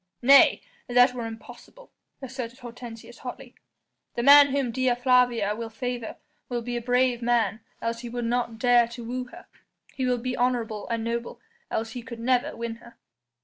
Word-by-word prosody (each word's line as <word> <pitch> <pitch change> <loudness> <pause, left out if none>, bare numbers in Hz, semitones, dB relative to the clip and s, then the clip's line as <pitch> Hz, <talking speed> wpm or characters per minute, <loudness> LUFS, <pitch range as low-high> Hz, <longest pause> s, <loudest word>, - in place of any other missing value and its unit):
"Nay! 275 +2 +6 0.2
that 245 +1 +5
were 240 -2 -4
impossible," 240 - -12 0.3
asserted 255 -2 -6
Hortensius 240 -1 -10
hotly; 250 - -8 0.6
"the 235 - -1
man 285 +2 +9
whom 275 -3 -1
Dea 255 0 +1
Flavia 245 -4 +2
will 230 0 -5
favour 240 +1 -5 0.3
will 240 -2 -3
be 245 +1 -4
a 240 - -2
brave 245 0 +1
man 235 -2 +1 0.2
else 230 0 -2
he 240 0 -7
would 240 0 -4
not 235 -1 -1
dare 240 0 +4
to 235 0 -9
woo 250 +2 -4
her; 345 +8 -14 0.5
he 260 -2 -2
will 250 -1 +1
be 250 +1 -3
honourable 240 -4 -1
and 230 -1 -2
noble 235 +1 -4 0.3
else 225 0 -3
he 245 - -6
could 235 -1 -9
never 245 +1 +1
win 230 -1 -4
her." 235 0 -17
240 Hz, 175 wpm, -26 LUFS, 230-250 Hz, 0.6 s, man